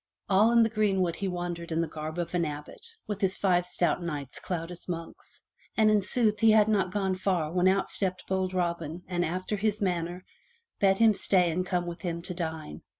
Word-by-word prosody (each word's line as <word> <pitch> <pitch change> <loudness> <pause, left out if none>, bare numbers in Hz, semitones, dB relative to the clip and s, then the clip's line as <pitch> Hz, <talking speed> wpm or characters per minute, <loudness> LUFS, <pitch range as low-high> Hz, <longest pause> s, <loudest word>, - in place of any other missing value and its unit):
All 205 +4 +4
in 235 -1 +6
the 225 - +2
greenwood 195 -6 +1
he 195 - -2
wandered 175 -2 -4
in 160 - 0
the 165 - +1
garb 155 +1 -6
of 170 0 -3
an 175 -1 +1
abbot, 150 - -6 0.2
with 210 -1 -4
his 190 -1 +1
five 180 -2 +2
stout 180 0 0
knights 145 -6 -5
clad 170 -1 -4
as 175 +1 -9
monks. 165 -1 -7 0.3
And 215 -1 +5
in 210 -1 +4
sooth 210 +1 +1
he 225 - +5
had 215 -1 +6
not 200 -4 +1
gone 195 -1 0
far 185 -4 0
when 180 +1 +2
out 195 +1 +2
stepped 185 -2 -2
bold 190 -1 0
Robin 170 -2 -2
and 175 -1 0
after 185 +5 -2
his 210 +1 0
manner 180 -2 -2 0.5
bade 195 -1 +4
him 225 0 +5
stay 180 -3 +2
and 180 +3 -1
come 180 -1 -1
with 175 0 -6
him 170 -2 -3
to 180 0 -5
dine. 160 - -5
180 Hz, 210 wpm, -28 LUFS, 170-195 Hz, 0.5 s, in